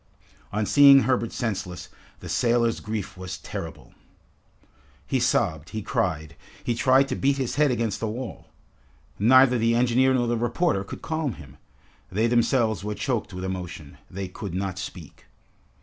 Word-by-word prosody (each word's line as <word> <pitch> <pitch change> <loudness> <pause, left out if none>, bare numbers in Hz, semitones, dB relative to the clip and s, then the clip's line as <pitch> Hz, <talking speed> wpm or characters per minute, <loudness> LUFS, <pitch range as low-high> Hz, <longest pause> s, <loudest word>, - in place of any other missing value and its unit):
On 105 +1 -1
seeing 140 +5 +7
Herbert 125 -3 0
senseless, 95 -7 -4 0.3
the - - -8
sailor's 115 -1 +1
grief 105 -3 -5
was 95 -1 -6
terrible. - - -8 1.1
He 130 - 0
sobbed, 90 -10 0
he 110 -1 -5
cried, 80 -4 -2 0.3
he 120 - 0
tried 130 +3 +3
to - - -1
beat 140 +1 +1
his 130 -3 -2
head 150 -1 +4
against 115 -4 -1
the 115 - -2
wall. 120 +2 -6 0.7
Neither 125 +3 +5
the 115 +1 +2
engineer 125 +2 +3
nor 120 -1 +1
the 120 0 0
reporter 120 - 0
could 100 - -9
calm 155 -5 -2
him. 70 -5 -13 0.5
They 105 +5 +1
themselves 115 -3 +2
were 105 0 -3
choked 120 -5 -2
with 90 0 -6
emotion. 90 -6 -6
They 95 +1 -5
could 95 -1 -7
not 95 -1 -3
speak. 90 -4 -9
115 Hz, 155 wpm, -25 LUFS, 95-125 Hz, 1.1 s, seeing